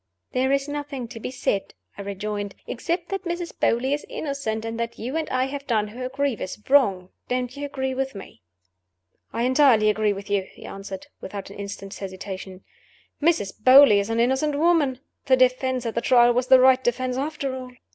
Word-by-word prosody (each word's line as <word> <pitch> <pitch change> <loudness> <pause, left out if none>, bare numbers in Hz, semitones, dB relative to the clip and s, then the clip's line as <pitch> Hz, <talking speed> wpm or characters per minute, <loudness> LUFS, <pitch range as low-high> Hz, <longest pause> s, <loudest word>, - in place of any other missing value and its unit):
"There 260 +1 +1
is 275 0 +1
nothing 290 -4 -5
to 225 - -8
be - - -5
said," 205 -6 -2 0.2
I - - -7
rejoined, 200 0 -4
"except 340 +7 -3
that 390 -1 -3
Mrs. 345 -1 -4
Beauly 255 +4 +1
is 295 - -2
innocent, 275 -7 -3
and 225 0 -4
that 235 0 -3
you 250 +6 -5
and 320 -1 -2
I 255 0 +1
have 280 +1 -6
done 215 -4 +1
her 250 +4 -6
a - - -8
grievous 265 -8 -2
wrong. 200 -10 +3 0.2
Don't 250 0 -2
you 285 0 -4
agree 265 -2 -3
with 270 -2 -3
me?" 195 - -11 0.9
"I 230 - -2
entirely 250 -5 +5
agree 210 0 +1
with 200 0 -6
you," 200 -2 0
he - - -13
answered, 195 +3 -7 0.2
without 195 0 -7
an - - -11
instant's 200 0 -7
hesitation. 190 -1 -7 0.6
"Mrs. 295 - +2
Beauly 255 -5 +8
is 200 +2 -2
an 225 0 0
innocent 265 +5 +1
woman. 300 -5 +2 0.3
The 260 -1 +5
defense 255 0 +2
at 230 - -2
the 235 - -1
Trial 240 -1 +5
was 250 +1 0
the 260 0 +8
right 260 0 +5
defense 255 +1 0
after 275 -1 -3
all." 255 -1 -7
255 Hz, 195 wpm, -24 LUFS, 210-275 Hz, 0.9 s, Beauly